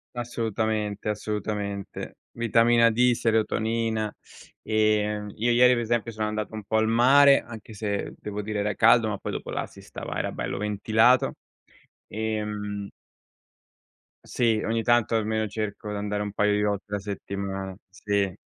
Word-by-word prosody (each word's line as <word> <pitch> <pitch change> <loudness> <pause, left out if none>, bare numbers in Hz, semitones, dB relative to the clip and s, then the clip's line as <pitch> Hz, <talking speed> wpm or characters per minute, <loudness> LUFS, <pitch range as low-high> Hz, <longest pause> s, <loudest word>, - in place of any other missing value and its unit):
Assolutamente, 110 -3 -2
assolutamente. 105 -1 -4
Vitamina 115 0 +4
D, 120 +2 +3
serotonina. 110 -1 0 0.5
Ehm, 105 -1 +1
io 120 +2 +1
ieri 125 +1 +6
per 120 - 0
esempio 115 0 -1
sono 110 -1 -2
andato 110 0 -4
un 110 - -6
po' 110 +2 0
al 110 0 +2
mare, 135 +5 +6
anche 110 -1 -11
se 100 -1 -3
devo 105 0 -5
dire 105 0 -3
era 105 0 0
caldo, 115 0 +5
ma 105 - -2
poi - - -5
dopo - - -5
là - - -2
si - - -15
stava - - -7
era - - -2
bello - - -4
ventilato, 110 +4 +3 0.7
ehm... 105 -2 -3 1.3
Sì, 115 -3 +1
ogni 115 0 0
tanto 120 -1 +3
almeno 110 0 0
cerco 105 0 -5
di - - -3
andare 105 0 -2
un 105 -1 -5
paio 105 0 +2
di 105 - +1
volte 105 -1 -1
la 105 - -1
settimana. 95 -1 -5
Sì. 100 -1 -1
110 Hz, 150 wpm, -26 LUFS, 105-115 Hz, 1.3 s, ieri